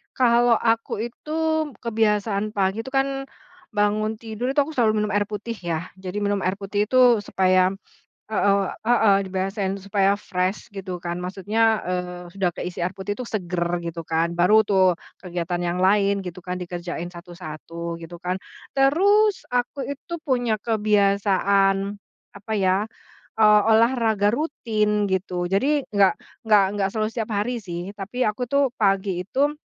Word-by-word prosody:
Kalau 240 -1 +4
aku 225 -1 0
itu, 300 +5 -12 0.5
kebiasaan 215 -2 0
pagi 195 +2 +1
itu 265 - -7
kan 270 0 0 0.5
bangun 215 +1 +1
tidur, 225 +2 -5
itu 290 - +2
aku 305 - -7
selalu 215 -4 +2
minum 210 - -2
air 205 0 +1
putih 215 +2 -5
ya, 170 -1 -4
jadi 190 +1 -6
minum 205 0 +1
air 185 0 0
putih 205 +1 -2
itu 250 -2 +5
supaya 185 -1 +2 0.6
heeh 200 -1 +3 0.2
heeh, 225 -4 +5
dibiasain 190 +1 -2
supaya 200 0 +2
fresh 185 0 -3
gitu 185 -3 -6
kan, 175 0 -3
maksudnya, 210 +5 +1
eee, 180 0 -4
sudah 195 -1 0
keisi 180 0 -5
air 180 +2 -1
putih 190 +1 -5
itu 250 - -5
seger 175 -5 -2 0.2
gitu 170 -1 -5
kan. 165 +1 +1
Baru 210 +5 +5
tuh 190 -4 +3 0.2
kegiatan 175 -1 -3
yang 175 +1 -1
lain 200 +1 +3
gitu 180 0 -7
kan 180 0 -5
dikerjain 175 -1 -5
satu-satu 170 -1 -7
gitu 170 +1 -9
kan. 180 +1 -2 0.3
Terus 390 +10 +3
aku 250 +3 -1
itu 285 +4 -7
punya 245 -5 +1
kebiasaan 200 -2 +2 0.3
apa 205 +2 -7
ya, 190 0 +2 0.5
eee, 210 -1 +7
olahraga 220 -3 +3
rutin 215 -8 0
gitu, 185 -2 -1
jadi 270 +10 +1
enggak 200 -2 +4 0.2
enggak 210 -3 +5
enggak 200 -2 0
selalu 215 0 -1
setiap 225 -2 -3
hari 220 +3 -1
sih. 175 +2 -6
Tapi 210 +5 -2
aku 210 +4 -2
tuh 280 -3 +2
pagi 195 -3 +1
itu 280 +10 0
200 Hz, 150 wpm, -23 LUFS, 185-225 Hz, 0.6 s, eee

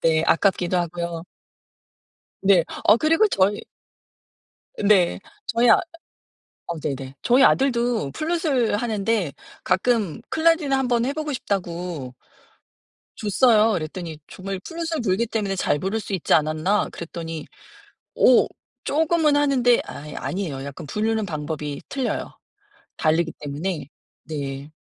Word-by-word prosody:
네. 160 -1 +3
아깝기도 180 0 +2
하고요. 170 -1 -3 1.2
네. 190 -4 +5 0.2
어 210 - +7
그리고 325 - +3
저희 200 - +2 1.2
네. 195 -4 +4 0.3
저희 235 +1 +2
아 - - +7 0.9
아 - - -3
네네. 135 -2 -4
저희 250 +3 +4
아들도 240 - +2
플루트을 305 - 0
하는데 215 - 0 0.3
가끔 210 -3 +1
"클라리넷 320 -3 +2
한번 250 -3 +2
해 270 - 0
보고 305 0 -4
싶다."고 175 - -4 1.0
줬어요. 220 +1 +4
이랬더니 160 0 -5
정말 190 0 -6
'플루트을 330 -2 -3
불기 205 +2 +1
때문에 210 -4 -2
잘 145 -5 0
부를 195 +4 -1
수 210 - -7
있지 185 -4 +1
않았나?' 155 +6 +1
그랬더니 165 -2 -6 0.7
어 - - +5 0.4
쪼금은 315 0 +2
하는데 265 -5 +3
아이 150 +1 -8
아니에요. 160 -8 -4
약간 140 +3 -8
부르는 215 +5 -1
방법이 150 -2 -4
틀려요. 265 -3 -3 0.6
다르기 160 +1 +1
때문에 150 +2 -4 0.4
네. 140 -1 -5
195 Hz, 265 characters per minute, -23 LUFS, 160-245 Hz, 1.2 s, 어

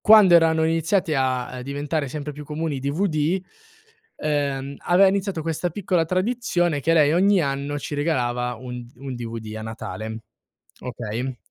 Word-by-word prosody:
Quando 210 -4 +8
erano 160 -1 +5
iniziati 165 +2 +1
a 130 -2 +1
a 125 0 -7
diventare 145 +3 -2
sempre 150 +2 -5
più 150 +1 -9
comuni 150 0 -3
i - - -4
DVD, 155 +4 0 0.8
ehm, 140 -2 -1
aveva 185 +3 +5
iniziato 190 -4 -1
questa 165 +2 -1
piccola 175 -1 0
tradizione 185 -4 0
che 160 +4 +1
lei 150 -2 +5
ogni 195 +3 +4
anno 140 -1 -1
ci 145 - -5
regalava 125 -5 0
un 125 +1 -7
un 135 +1 -6
DVD 115 -2 -6
a - - -6
Natale, 110 0 -6 0.6
okay? 120 +1 -4
150 Hz, 150 wpm, -23 LUFS, 130-170 Hz, 0.8 s, Quando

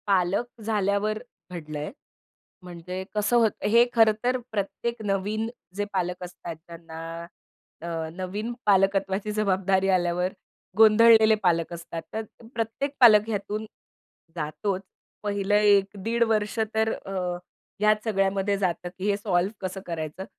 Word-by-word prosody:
पालक 195 +4 +2 0.2
झाल्यावर 210 0 +1 0.3
घडलंय, 155 -3 -5 0.7
म्हणजे 180 +1 -6
कसं 210 +3 +1
होतं, 225 -2 +1
हे 235 +2 +6
खरं 225 -2 +5
तर 250 +1 +2
प्रत्येक 220 +3 -3
नवीन 205 +3 -1 0.3
जे 205 +1 -1
पालक 180 -1 -2
असतात 175 -1 -7
त्यांना 165 -1 -10 0.8
अ, - - -5 0.3
नवीन 190 +6 -4
पालकत्वाची 195 0 +2
जबाबदारी 195 -2 +1
आल्यावर 180 0 +1 0.4
गोंधळलेले 220 0 +7
पालक 170 -2 +1
असतात. 165 -1 -6
तर 220 - -1 0.3
प्रत्येक 230 +5 -2
पालक 215 -4 +7
ह्यातून 210 0 -3 0.7
जातोच. 180 +5 -2 0.4
पहिलं 205 0 0
1 205 -1 +4
दीड 235 +2 +2
वर्ष 210 +1 -1 0.2
तर 220 0 +2
अ, 195 - -8 0.7
ह्या 215 0 +6
सगळ्यामध्ये 195 -1 +1
जातं, 180 -2 -1
की 190 - -5
हे 200 - +2
सॉल्व्ह 195 -1 0
कसं 190 +1 -7
करायचं? 165 +2 -5
200 Hz, 125 wpm, -26 LUFS, 180-215 Hz, 0.8 s, गोंधळलेले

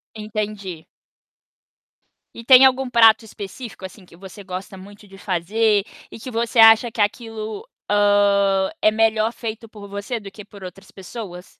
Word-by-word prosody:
Entendi. 210 -5 -6 1.5
E 230 - -11
tem 260 +2 +7
algum 260 0 +1
prato 225 -2 +5
específico, 215 0 -10
assim, 190 +1 -12
que 170 - -19
você 195 +2 -12
gosta 185 +1 -8
muito 205 +2 -15
de 195 0 -15
fazer 205 +3 0 0.3
e - - -11
que 250 +3 -8
você 230 +2 -3
acha 225 +1 +6
que - - -11
aquilo, 215 0 -3 0.2
hã, 200 -1 +2
é - - +5
melhor 220 0 +1
feito 225 -1 -8
por 205 -2 -12
você 200 +4 -5
do 200 -2 -11
que 210 +1 -12
por 200 -1 -15
outras 185 +1 -11
pessoas? 190 -2 -10
210 Hz, 155 wpm, -20 LUFS, 195-225 Hz, 1.5 s, tem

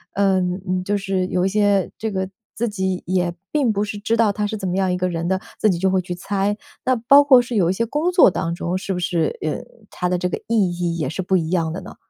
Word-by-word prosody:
嗯， 185 -1 0
就 205 +2 0
是 195 -2 -1
有 180 0 0
一 - - +2
些 205 -2 +2
这 220 -1 -3
个 190 -1 -2 0.2
自 235 +1 -1
己 190 -3 -2
也 180 -1 0 0.2
并 275 -7 +1
不 205 -1 -1
是 205 0 -5
知 220 +2 0
道 215 -3 +3
他 210 0 -1
是 215 +1 -3
怎 190 -2 -4
么 180 - -1
样 190 -1 +1
一 180 - 0
个 185 0 0
人 170 -1 -3
的， 190 0 +1 0.2
自 215 - +3
己 175 - +1
就 190 +2 +1
会 190 -1 +2
去 180 0 -5
猜。 200 +3 -1 0.3
那 255 -1 +2
包 275 +5 +6
括 260 -3 +7
是 240 -1 -5
有 175 -4 +3
一 - - +2
些 230 +4 -1
工 305 +9 0
作 350 - +6
当 170 -1 -2
中 175 +1 -2
是 195 +1 -5
不 180 - -3
是， 170 -2 -1
呃， 155 - -2 0.3
他 180 0 -2
的 180 - +1
这 180 - -1
个 - - -3
意 210 -6 +3
义 175 -1 -2
也 150 -5 -1
是 165 +6 -3
不 185 +1 +1
一 165 0 -2
样 165 -3 +1
的 180 - -4
呢？ - - -11
190 Hz, 295 characters per minute, -21 LUFS, 180-210 Hz, 0.3 s, 括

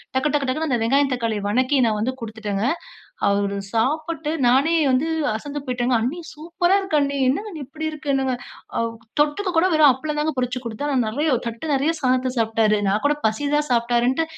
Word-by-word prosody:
டக்கு 265 +3 +2
டக்கு, 285 -2 +1
டக்குன்னு 310 +4 -1
அந்த 245 - +2
வெங்காயம், 275 +3 +2
தக்காளிய 225 -4 -2
வணக்கி 255 +6 +2
நான் 215 - 0
வந்து 230 +5 0
குடுத்துட்டங்க. 215 -3 -4 0.7
அவரு 200 0 0 0.2
சாப்புட்டு 305 +6 -1 0.2
நானே 275 +7 +3 0.2
வந்து 260 +5 +2 0.3
அசந்து 290 +6 -6
போய்ட்டேங்க, 250 0 0
"அண்ணி 265 +9 -2 0.2
சூப்பர்ரா 345 +4 +1
இருக்கு 380 -6 0
அண்ணி. 280 0 0
என்னங்க 395 +12 -1
அண்ணி 310 -4 -6
இப்படி 315 +2 -7
இருக்கு? 305 -1 -9
என்னங்க 265 -1 0 0.4
அவ் 230 0 -1 0.3
தொட்டுக்கு 300 +7 +1
கூட 330 +3 +5
வெறும் 310 -2 +6
அப்பளம் 300 +4 -4
தாங்க 305 +1 0
பொறுச்சுக் 250 0 -2
குடுத்தன். 235 +6 -3
ஆனா 255 - +3
நெறைய 295 +8 0 0.2
தட்டு 230 +5 -5
நெறைய 280 +3 +2
சாதத்த 255 -1 +1
சாப்பிட்டாரு. 225 -1 +2
நான் 200 +2 +1
கூட 290 +1 +3
பசி 220 +6 -1
தான் 295 0 +1
சாப்பிட்டாருன்ட்டு 240 +5 +2
260 Hz, 185 wpm, -22 LUFS, 230-300 Hz, 0.7 s, வெறும்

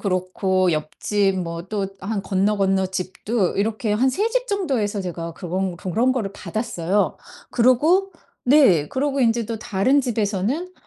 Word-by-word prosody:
그렇고 185 -1 0
옆집 190 +6 0
뭐 170 0 -5
또 205 -2 -1
한 200 +1 -3
건너건너집도 190 +1 0
이렇게 215 +1 0
한 245 +6 +3
3 415 - 0
집 - - -1
정도에서 265 - -1
제가 170 -2 -5
그런 180 +2 -3
그런 225 +9 +1
거를 220 -7 -2
받았어요. 205 -3 -1 0.3
그러고 310 +11 +3 0.3
네 245 - +5
그러고 275 +1 -1
인제 230 -2 +2
또 230 -2 -4
다른 220 +9 +2
집에서는 230 - -1
205 Hz, 280 characters per minute, -22 LUFS, 185-255 Hz, 0.3 s, 네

